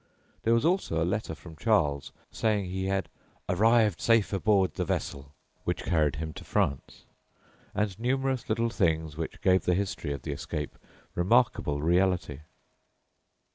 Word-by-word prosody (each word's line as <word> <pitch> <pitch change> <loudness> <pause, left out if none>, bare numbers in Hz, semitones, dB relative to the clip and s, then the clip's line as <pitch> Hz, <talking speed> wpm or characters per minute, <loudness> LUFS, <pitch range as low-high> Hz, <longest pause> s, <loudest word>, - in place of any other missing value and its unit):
There 115 +1 +3
was 115 - +1
also 170 - +1
a 80 - +2
letter 95 -2 -2
from 80 +1 -12
Charles 75 -9 +1 0.2
saying 105 -3 0
he 95 0 -2
had 95 -2 0 0.4
"arrived 110 0 +3
safe 115 -3 +3
aboard 100 -1 +3
ye - - +2
vessell" 70 0 -4 0.3
which - - -2
carried 75 -4 +2
him 80 +1 -5
to - - -9
France, 65 - -2 0.7
and 105 -2 -1
numerous 130 +1 -1
little 115 +1 +1
things 80 -7 0
which 80 +1 -5
gave 95 -1 +3
the 90 - +3
history 95 -6 -2
of 70 - -5
the 75 - -3
escape 75 +1 -4 0.4
remarkable 90 - +2
reality. 90 -4 +1
95 Hz, 145 wpm, -28 LUFS, 80-110 Hz, 0.7 s, There